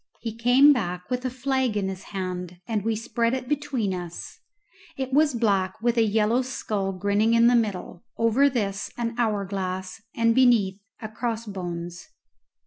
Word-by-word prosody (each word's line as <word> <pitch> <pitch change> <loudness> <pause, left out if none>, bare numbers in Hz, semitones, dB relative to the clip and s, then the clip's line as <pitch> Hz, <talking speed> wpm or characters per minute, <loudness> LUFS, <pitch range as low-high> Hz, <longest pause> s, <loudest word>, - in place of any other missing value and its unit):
He 225 -2 -5
came 250 +5 +6
back 180 -6 -4
with 250 +1 -1
a - - +1
flag 260 -2 -1
in 195 -2 0
his 190 0 -6
hand, 180 -2 -5
and 215 -3 -1
we 225 0 0
spread 230 +2 0
it 255 -1 -5
between 275 -8 -1
us; 175 -2 -7 0.6
it 265 -1 -4
was 290 -2 +4
black, 195 -5 +1
with 235 +1 +1
a 230 - +3
yellow 220 +2 +2
skull 210 -6 -3
grinning 205 +4 +1
in 230 0 +5
the 245 +1 +5
middle, 205 -6 -2
over 230 +5 +4
this 205 -6 -2
an 235 -1 -2
hourglass, 195 -3 -2
and 230 0 +3
beneath 225 -6 +3 0.2
a - - -3
cross 230 +1 -3
bones. 175 - -6
225 Hz, 165 wpm, -25 LUFS, 195-245 Hz, 0.6 s, came